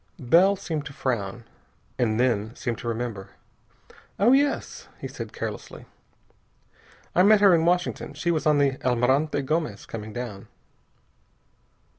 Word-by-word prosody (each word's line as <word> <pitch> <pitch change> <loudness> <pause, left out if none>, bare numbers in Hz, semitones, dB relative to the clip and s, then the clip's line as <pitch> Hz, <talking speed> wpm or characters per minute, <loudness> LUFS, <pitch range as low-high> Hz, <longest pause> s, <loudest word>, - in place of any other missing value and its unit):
Bell 170 +8 +4
seemed 160 -5 -4
to 140 - -10
frown, 120 -4 -3 0.6
and 110 -2 +1
then 115 -2 0
seemed 120 -4 -4
to 120 - -7
remember. 115 -4 -4 0.9
"Oh, 215 +5 +4
yes," 280 +1 +1
he - - -5
said - - -8
carelessly, - - -7 1.3
"I - - +4
met 210 +2 +6
her 200 -3 +7
in 165 -1 +3
Washington. 175 -4 0
She 170 +4 0
was 155 -2 0
on 150 -1 +4
the 140 -2 +1
Almirante 130 +4 +1
Gomez, 155 +3 -2
coming 110 -1 -7
down." 115 -4 -7
135 Hz, 135 wpm, -25 LUFS, 120-170 Hz, 1.3 s, her